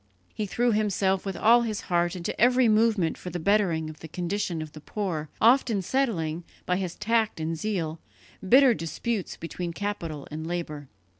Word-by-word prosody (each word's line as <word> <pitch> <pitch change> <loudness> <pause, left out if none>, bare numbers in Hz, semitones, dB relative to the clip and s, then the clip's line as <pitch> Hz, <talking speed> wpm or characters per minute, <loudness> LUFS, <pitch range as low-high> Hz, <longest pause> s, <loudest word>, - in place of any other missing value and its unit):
He 215 - -3
threw 240 +5 +1
himself 200 -2 +1
with 195 - -3
all 235 +2 +6
his 220 -3 -2
heart 175 0 0
into 180 +2 -4
every 250 +1 +5
movement 215 -6 +2
for 180 - -6
the 175 - -4
bettering 175 -4 +2
of 155 -1 -9
the 160 - -9
condition 175 +1 -2
of 155 -1 -6
the 155 - -11
poor, 165 -4 -3
often 230 -4 +4
settling, 175 - -1 0.2
by 180 - +1
his 185 -3 -3
tact 225 -4 0
and 160 +1 -2
zeal, 165 -4 -2 0.5
bitter 260 +1 +7
disputes 210 +3 -3
between 170 +1 -5
capital 170 -7 -4
and 155 +1 -5
labour. 155 -5 -4
185 Hz, 170 wpm, -27 LUFS, 165-215 Hz, 0.5 s, bitter